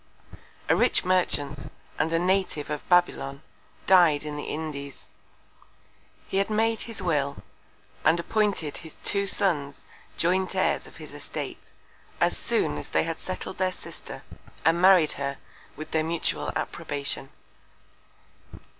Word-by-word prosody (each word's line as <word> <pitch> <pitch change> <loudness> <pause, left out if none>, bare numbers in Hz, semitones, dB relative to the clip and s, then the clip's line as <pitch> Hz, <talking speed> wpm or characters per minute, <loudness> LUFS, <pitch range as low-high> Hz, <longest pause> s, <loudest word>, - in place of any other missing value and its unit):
A - - +5
rich - - +3
Merchant, 145 -6 0 0.3
and 160 - +1
a 165 - +3
Native 180 -4 0
of 150 - -5
Babylon, 160 -6 +2 0.4
died 175 -6 +6
in 150 -1 -5
the 145 - -5
Indies. 145 -3 -5 1.2
He 195 - -2
had 195 +1 +2
made 225 +1 +1
his 225 -4 -5
Will, 145 -5 0 0.6
and 160 +2 +4
appointed 200 -5 0
his 160 -1 -10
two 200 0 +1
Sons 150 -8 0 0.3
Joint 185 +2 +1
Heirs - - +1
of - - -15
his - - -10
Estate, - - -7 0.5
as - - +3
soon 75 0 +1
as - - -8
they - - +2
had 165 0 -3
settled 185 0 -5
their 185 -1 +2
Sister, - - -9 0.4
and 165 +2 +4
married 185 -4 +7
her 140 0 -2 0.4
with 155 +2 -8
their 160 -1 +2
mutual 165 +1 -1
Approbation. 140 -1 -3
165 Hz, 135 wpm, -27 LUFS, 145-185 Hz, 1.2 s, married